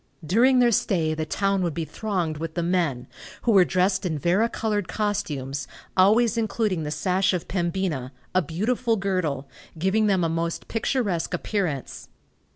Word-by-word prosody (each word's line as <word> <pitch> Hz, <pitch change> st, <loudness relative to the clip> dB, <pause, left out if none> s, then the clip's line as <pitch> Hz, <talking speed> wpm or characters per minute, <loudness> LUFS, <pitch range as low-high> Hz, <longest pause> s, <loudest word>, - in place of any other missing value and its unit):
During 245 Hz, -, +4 dB
their 245 Hz, -1 st, +5 dB
stay 165 Hz, -7 st, +1 dB
the 155 Hz, 0 st, -3 dB
town 195 Hz, -1 st, 0 dB
would 170 Hz, -4 st, -1 dB
be 165 Hz, -1 st, -2 dB
thronged 175 Hz, -6 st, -2 dB
with 165 Hz, 0 st, -5 dB
the 170 Hz, -, 0 dB
men, 170 Hz, -8 st, 0 dB, 0.4 s
who 235 Hz, -, +3 dB
were 195 Hz, -4 st, +7 dB
dressed 185 Hz, +2 st, +1 dB
in 165 Hz, -5 st, -1 dB
vari 185 Hz, +10 st, +2 dB
colored 210 Hz, -5 st, -1 dB
costumes, 145 Hz, -11 st, -2 dB, 0.3 s
always 220 Hz, +4 st, +4 dB
including 215 Hz, -5 st, 0 dB
the 150 Hz, -, -3 dB
sash 185 Hz, +5 st, +1 dB
of 180 Hz, -, -3 dB
Pembina, 170 Hz, -7 st, -2 dB, 0.2 s
a 185 Hz, -, +4 dB
beautiful 225 Hz, -, 0 dB
girdle, 185 Hz, -9 st, -1 dB, 0.3 s
giving 195 Hz, +6 st, +2 dB
them 190 Hz, -3 st, +2 dB
a -, -, +2 dB
most 165 Hz, +1 st, -2 dB
picturesque 210 Hz, -8 st, -1 dB
appearance. 175 Hz, -8 st, -3 dB
185 Hz, 160 wpm, -25 LUFS, 160-210 Hz, 0.4 s, were